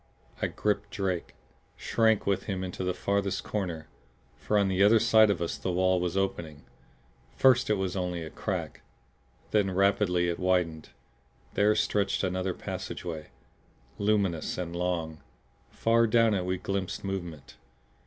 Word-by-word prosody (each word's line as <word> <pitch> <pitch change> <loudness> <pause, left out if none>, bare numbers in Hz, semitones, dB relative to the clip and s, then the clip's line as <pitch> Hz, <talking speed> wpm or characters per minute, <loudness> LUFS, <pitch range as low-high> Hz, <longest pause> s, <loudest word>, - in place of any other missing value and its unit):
I - - +2
gripped 105 -1 -1
Drake; 95 -7 -3 0.4
shrank 110 -2 +2
with 100 -1 0
him 95 -3 -3
into 95 0 -5
the 90 - 0
farthest 100 +1 -1
corner 90 -6 -4 0.5
for 105 - -1
on 100 -1 +3
the 95 0 0
other 110 +3 +6
side 110 0 +5
of 85 -4 0
us 85 - -4
the 95 - -2
wall 95 +1 +2
was 90 +1 -2
opening. 85 -6 -2 0.7
First 130 -2 +4
it 105 - +3
was 95 -2 -2
only 90 -2 -2
a 80 - -8
crack; - - -4 0.7
then 105 -2 +2
rapidly 95 -2 +2
it 85 -1 -2
widened. 90 -4 0 0.6
There 105 +1 +3
stretched 100 -2 0
another 95 0 -1
passageway, 80 -3 -6 0.7
luminous 100 -6 0
and 85 -1 -4
long; 85 -3 -2 0.5
far 115 0 +2
down 115 0 +4
it 95 -3 -1
we 90 0 -1
glimpsed 95 0 -3
movement. 85 -7 -6
95 Hz, 145 wpm, -28 LUFS, 90-100 Hz, 0.7 s, other